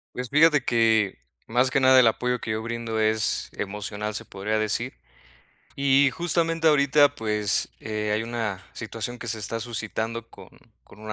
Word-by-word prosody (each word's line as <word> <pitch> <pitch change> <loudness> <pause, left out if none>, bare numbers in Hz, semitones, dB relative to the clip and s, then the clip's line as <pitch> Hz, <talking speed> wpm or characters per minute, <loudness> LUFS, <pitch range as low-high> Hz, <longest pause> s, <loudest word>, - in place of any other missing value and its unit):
Pues 125 -1 -4
fíjate 150 -2 +4
que, 110 -4 +2 0.3
más 125 +3 +2
que 135 0 +1
nada 130 0 +7
el 120 - +6
apoyo 125 +2 0
que 110 - -4
yo 110 +1 -3
brindo 115 -1 -3
es 110 0 +1
emocional, 105 +1 -4
se - - -4
podría 105 +3 -3
decir. 110 +4 -1 0.8
Y 140 0 +4
justamente 165 0 0
ahorita, 145 -1 +4
pues, 105 -4 0
eh, 105 -1 -3
hay 110 +2 0
una 110 -5 -4
situación 115 +1 -6
que 115 - -6
se 110 0 -2
está 115 +2 -2
suscitando 115 0 -4
con - - -14 0.3
con 105 - -18
un 110 0 -6
115 Hz, 165 wpm, -25 LUFS, 110-130 Hz, 0.8 s, nada